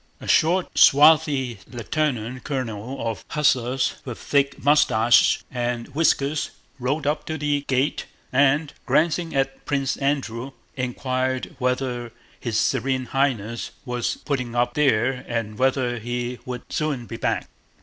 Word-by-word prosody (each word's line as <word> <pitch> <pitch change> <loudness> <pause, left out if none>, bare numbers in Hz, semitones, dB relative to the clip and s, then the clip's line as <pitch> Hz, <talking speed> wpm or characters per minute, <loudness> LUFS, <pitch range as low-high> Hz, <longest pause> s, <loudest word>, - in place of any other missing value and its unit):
A - - -10
short, 175 +3 +2
swarthy 140 -5 +5
lieutenant 125 -1 -2
colonel 125 -2 -4
of 115 - -4
hussars 130 -3 +1
with 125 -4 -6
thick 140 -1 +1
mustaches 120 -6 +4
and 120 -1 -2
whiskers 145 0 +1 0.3
rode 135 +4 -1
up 150 +1 0
to 160 - -2
the 145 -1 0
gate 130 +2 0 0.3
and, 145 +2 +3
glancing 160 +4 +1
at 135 0 -1
Prince 140 -2 0
Andrew, 135 -2 -2 0.2
inquired 130 0 -2
whether 125 -2 -1 0.3
his 115 -3 -1
Serene 130 0 0
Highness 120 -5 0 0.2
was 125 -1 -2
putting 125 -5 -2
up 120 0 +1
there 130 -3 +2
and 115 -3 -3
whether 130 -2 +1
he 120 +2 -4
would 125 -1 -5
soon 145 -6 -1
be 115 - -7
back. - - -1
130 Hz, 130 wpm, -23 LUFS, 120-140 Hz, 0.3 s, swarthy